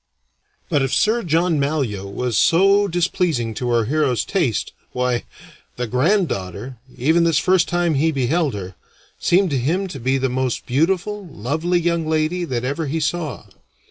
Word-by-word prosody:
But 145 - +1
if 135 -1 0
Sir 225 +3 +2
John 165 -2 +1
Malyoe 135 -10 -1
was 125 +3 -2
so 195 - +4
displeasing 170 - 0
to 125 +3 -3
our 120 -2 +2
hero's 135 -3 +1
taste, 165 - -1 0.2
why, 125 -1 -1 0.5
the 125 - -2
granddaughter, 125 - -1 0.2
even 160 +7 +3
this 165 -3 +3
first 185 +1 +3
time 175 -1 +1
he 155 +3 +2
beheld 140 +1 0
her, 95 -2 -6 0.5
seemed 185 0 +2
to 135 - +1
him 170 +10 0
to 140 - -7
be 130 +3 +1
the 135 0 0
most 130 -1 -2
beautiful, 190 +8 0
lovely 160 +7 -1
young 170 -1 0
lady 160 +3 0
that 125 -6 -3
ever 145 +4 -2
he 160 +4 -1
saw. 155 - -3
155 Hz, 160 wpm, -21 LUFS, 125-175 Hz, 0.5 s, so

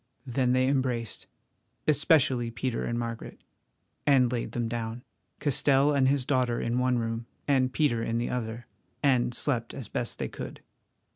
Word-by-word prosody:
Then 125 0 +1
they 130 0 +3
embraced—especially 130 +1 0
Peter 120 +1 -2
and 120 - -2
Margaret—and 120 +2 -2
laid 120 -2 -3
them 120 -1 -1
down, 115 +1 -4 0.4
Castell 140 0 +3
and 135 -2 +3
his 135 -1 +2
daughter 125 -4 +1
in 120 +2 0
one 125 -1 +2
room, 115 0 -3 0.2
and 130 -3 +3
Peter 130 -6 +1
in 115 0 -1
the 120 - -1
other, 115 -1 -4 0.4
and 125 -3 +3
slept 120 -5 -1
as 130 -6 -7
best 120 - -3
they - - -2
could. - - -8
125 Hz, 145 wpm, -28 LUFS, 115-135 Hz, 0.4 s, they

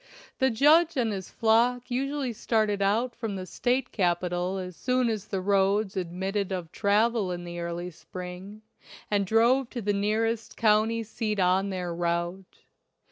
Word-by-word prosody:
The 265 -1 +4
judge 310 +7 +4
and 235 -3 +1
his 190 -3 -5
flock 240 +3 +2
usually 270 0 -1
started 215 -2 0
out 225 +5 +1
from 225 -4 -4
the 185 -1 -5
State 250 +6 -1
capital 180 0 0
as 180 -2 -6
soon 250 +2 +1
as 215 -2 -3
the 190 -2 -2
roads 200 +1 +2
admitted 190 +2 -2
of 180 -4 -4
travel 210 -1 +1
in 175 0 -5
the 175 0 -6
early 170 +1 -4
spring, 185 +5 -9 0.5
and 200 -2 +1
drove 235 +4 +3
to 245 - -5
the 205 +1 +1
nearest 220 +3 -1
county 220 +1 +3
seat 215 -1 -3
on 190 +2 +2
their 180 -2 -3
route. 170 +2 -3
205 Hz, 155 wpm, -27 LUFS, 185-230 Hz, 0.5 s, The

